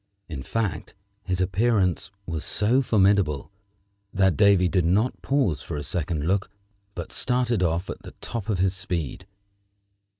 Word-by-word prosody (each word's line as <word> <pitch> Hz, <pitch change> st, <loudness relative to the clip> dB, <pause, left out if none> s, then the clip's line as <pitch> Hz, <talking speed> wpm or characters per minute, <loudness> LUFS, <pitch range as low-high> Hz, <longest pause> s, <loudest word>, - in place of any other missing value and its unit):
In 75 Hz, -5 st, -6 dB
fact, 105 Hz, +6 st, -3 dB, 0.3 s
his 90 Hz, 0 st, -1 dB
appearance 95 Hz, -1 st, +1 dB, 0.2 s
was 80 Hz, -2 st, -3 dB
so 115 Hz, +6 st, +2 dB
formidable 100 Hz, -, +2 dB, 0.6 s
that 95 Hz, -2 st, +3 dB
Davy 100 Hz, -3 st, +5 dB
did 90 Hz, 0 st, +1 dB
not 100 Hz, +9 st, +1 dB
pause 130 Hz, -, +1 dB
for -, -, -5 dB
a 75 Hz, -, -4 dB
second 80 Hz, 0 st, -2 dB
look, 95 Hz, +2 st, +1 dB, 0.5 s
but 85 Hz, -2 st, -6 dB
started 125 Hz, -4 st, +1 dB
off 85 Hz, +1 st, 0 dB
at -, -, -6 dB
the -, -, -12 dB
top 115 Hz, -2 st, -5 dB
of 105 Hz, -, +1 dB
his 95 Hz, +1 st, +1 dB
speed. 90 Hz, -7 st, -4 dB
95 Hz, 145 wpm, -25 LUFS, 85-105 Hz, 0.6 s, Davy